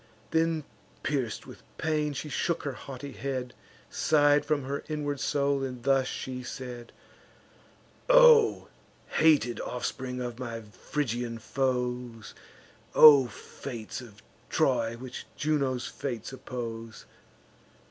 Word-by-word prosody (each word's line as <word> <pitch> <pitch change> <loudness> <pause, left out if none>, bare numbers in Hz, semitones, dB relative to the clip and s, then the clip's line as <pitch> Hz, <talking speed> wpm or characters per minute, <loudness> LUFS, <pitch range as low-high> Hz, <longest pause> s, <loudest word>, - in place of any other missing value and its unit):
Then, 160 -1 +1 0.4
pierc'd 130 -7 -2
with - - -12 0.2
pain, 150 -2 0
she 145 - -5
shook 170 +2 -1
her 140 - -2
haughty 135 +3 -8
head, 130 -2 -4 0.4
Sigh'd 145 -1 +4
from 150 -2 0
her 140 +2 -4
inward 145 -2 -2
soul, 140 +2 +1
and 125 -2 -5
thus 135 -1 +3
she 130 -1 -5
said: 125 -1 -7 1.2
"O - - +7 0.4
hated 150 -7 +3
offspring 125 +1 -4
of 120 -1 -5
my 120 -2 -4
Phrygian 120 +2 -3
foes! 125 -2 -2 0.6
O 145 -4 +9
fates 120 +1 -8
of 105 -4 -14 0.3
Troy, 115 +1 +1
which 130 +1 -8
Juno's 140 -4 0
fates 120 -2 -5
oppose! 115 -3 -6
130 Hz, 110 wpm, -29 LUFS, 120-145 Hz, 1.2 s, O